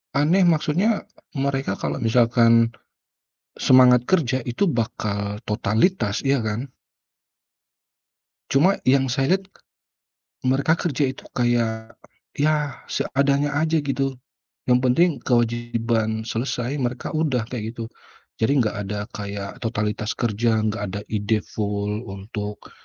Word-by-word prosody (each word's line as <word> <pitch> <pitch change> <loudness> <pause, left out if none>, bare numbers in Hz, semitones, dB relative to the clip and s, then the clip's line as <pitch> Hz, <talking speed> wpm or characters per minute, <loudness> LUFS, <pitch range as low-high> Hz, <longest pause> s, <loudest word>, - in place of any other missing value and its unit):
Aneh 170 +6 +4
maksudnya 175 +7 +2 0.3
mereka 135 -6 -1
kalau - - -3
misalkan, 115 0 +4 0.9
semangat 125 -1 +6
kerja 145 -9 +2
itu 120 +11 -1
bakal 105 -3 -3
totalitas 105 - 0
ya 135 0 +2
kan? 115 +4 -3 1.8
Cuma 175 +9 +4
yang 135 0 +3
saya 135 +9 +2
lihat, 190 - -17 1.0
mereka 135 +5 +2
kerja 150 -4 -1
itu 130 - -7
kayak, 115 -2 0 0.4
ya, 150 -1 0
seadanya 140 +1 0
aja 160 +1 +2
gitu. 135 -2 -2 0.5
Yang 125 - +5
penting 170 +8 +4
kewajiban 115 -2 0
selesai 125 +3 -2
mereka 125 -1 -3
udah 150 -7 0
kayak 115 -2 -5
gitu, 115 - -5 0.5
jadi 115 +5 +2
nggak 110 -3 0
ada 105 +1 -3
kayak 100 +1 -6
totalitas 110 -2 -2
kerja, 110 -1 +1
nggak 105 -1 -1
ada 100 +2 -5
ide 105 0 0
full 105 +1 -3
untuk 105 +1 -7
120 Hz, 115 wpm, -23 LUFS, 110-140 Hz, 1.8 s, semangat